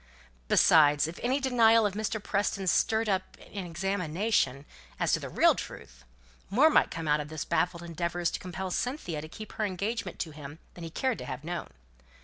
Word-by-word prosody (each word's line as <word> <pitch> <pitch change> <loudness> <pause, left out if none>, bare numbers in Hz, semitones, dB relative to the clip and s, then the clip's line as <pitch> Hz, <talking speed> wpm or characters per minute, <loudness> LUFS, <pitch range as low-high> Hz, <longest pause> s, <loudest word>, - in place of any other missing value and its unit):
Besides, 150 - +5
if 165 - -8
any 255 +3 +1
denial 230 -4 +4
of 205 - 0
Mr. 215 +1 -2
Preston's 195 -2 0
stirred 220 0 +2
up 190 -2 -2 0.2
an 195 -3 -4
examination 175 - 0 0.3
as - - +1
to - - +3
the - - -6
real - - +5
truth, - - -9 0.4
more 275 +11 +5
might - - +4
come 165 -1 -5
out 150 0 +3
of 150 0 -5
his 155 -2 -5
baffled 175 -1 0
endeavours 170 0 -2
to - - -4
compel 185 +1 -5
Cynthia 180 - -2
to 155 - -8
keep 215 +7 -9
to - - -13
her 215 - 0
engagement 200 0 -3
to 160 - -4
him 145 0 -9 0.2
than 175 - -10
he 165 - -5
cared 255 +8 -1
to - - -6
have 130 +3 -6
known. 175 +1 -4
180 Hz, 195 wpm, -29 LUFS, 160-215 Hz, 0.4 s, Besides